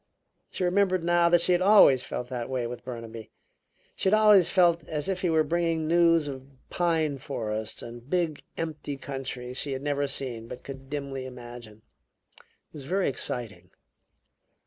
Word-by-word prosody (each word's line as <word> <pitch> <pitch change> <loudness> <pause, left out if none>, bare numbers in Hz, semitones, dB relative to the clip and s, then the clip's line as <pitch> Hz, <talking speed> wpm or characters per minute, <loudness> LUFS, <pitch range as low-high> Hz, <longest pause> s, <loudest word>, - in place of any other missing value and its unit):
She - - -4
remembered 185 -1 +2
now 175 0 +3
that 175 0 +4
she 180 - +4
had 175 0 +3
always 185 -10 +6
felt 125 - -5
that 125 -2 -4
way 130 -2 -2
with 120 0 -7
Burnaby; 115 -3 -8 0.7
she 190 - +1
had 210 - +5
always 210 -4 +6
felt 170 -3 +3
as 150 +1 -3
if 190 -2 -2
he 180 - +1
were 160 -1 +3
bringing 165 0 0
news 165 -2 +4
of 135 -1 -7 0.2
pine 160 -5 0
forests 110 -5 -4
and 120 +2 -10
big 170 -4 -1 0.2
empty 155 -3 -4
countries 130 -2 -5
she 140 - 0
had 135 +1 -5
never 145 -1 0
seen 125 -5 -4
but 125 - -9
could 135 -1 -10
dimly 140 -2 -5
imagine. 120 -3 -11 0.6
It - - -30
was 145 -3 -8
very 190 +5 0
exciting. 110 -8 -4
145 Hz, 170 wpm, -27 LUFS, 125-170 Hz, 0.7 s, always